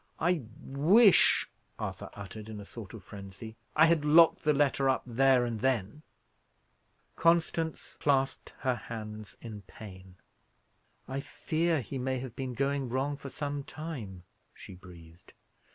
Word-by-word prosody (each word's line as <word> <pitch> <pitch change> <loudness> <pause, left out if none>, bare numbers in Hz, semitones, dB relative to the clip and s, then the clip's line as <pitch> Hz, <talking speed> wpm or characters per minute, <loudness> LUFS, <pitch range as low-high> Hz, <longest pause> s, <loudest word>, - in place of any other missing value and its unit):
"I 175 -1 +2 0.2
wish" 180 - +5 0.3
Arthur - - -5
uttered, 105 +2 -8
in 110 -1 -7
a 100 - -9
sort 110 0 -9
of 105 - -11
frenzy, 100 +3 -10 0.2
"I 160 - +7
had 165 -2 +3
locked 160 +2 +6
the 150 - +3
letter 140 -2 +2
up 130 - +1
there 130 +1 +3
and 115 -2 -3
then." 120 +1 -1 1.1
Constance 165 -1 +1
clasped 135 -2 +1
her 130 -2 +2
hands 110 -3 -8
in 110 -3 -7
pain. 95 -2 -12 0.9
"I 135 +1 -3
fear 160 +2 -1
he 130 +3 -6
may 130 +1 -1
have 125 -2 -7
been 130 -2 -4
going 140 0 0
wrong 135 +4 -1
for 140 0 -9
some 145 0 -4
time," 125 - -7 0.3
she - - -11
breathed. 85 -2 -15
130 Hz, 140 wpm, -30 LUFS, 105-145 Hz, 1.1 s, I